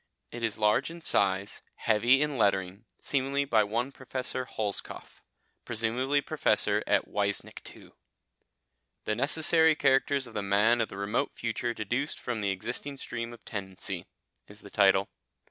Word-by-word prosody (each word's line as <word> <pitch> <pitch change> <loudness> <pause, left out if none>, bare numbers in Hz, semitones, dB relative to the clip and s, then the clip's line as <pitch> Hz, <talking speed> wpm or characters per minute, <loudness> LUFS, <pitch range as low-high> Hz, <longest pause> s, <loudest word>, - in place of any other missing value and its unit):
It 120 - -7
is 115 -2 -1
large 105 +5 +2
in 170 +1 -10
size, 100 -7 +1
heavy 120 +6 +3
in 150 -1 -2
lettering, 95 -1 +1
seemingly 140 +1 -1
by 110 -5 +3
one 115 +6 -2
Professor 130 -1 -4
Holzkopf, 105 -5 -6 0.4
presumably 120 +5 0
Professor - - +1
at - - +2
Weissnichtwo. - - -3 1.1
"The 110 - 0
Necessary 160 +4 +3
Characters 135 -1 +2
of 120 - -10
the 105 - -2
Man 105 +4 +3
of 115 - -1
the 95 - -9
Remote 100 +8 -1
Future 120 +1 -2
deduced 120 +7 -2
from 120 -2 -3
the 100 -2 0
Existing 120 +8 -3
Stream 115 -2 -5
of 120 -2 -13
Tendency" 95 -3 -4 0.4
is - - -9
the - - -12
title. - - +4
115 Hz, 145 wpm, -29 LUFS, 105-135 Hz, 1.1 s, title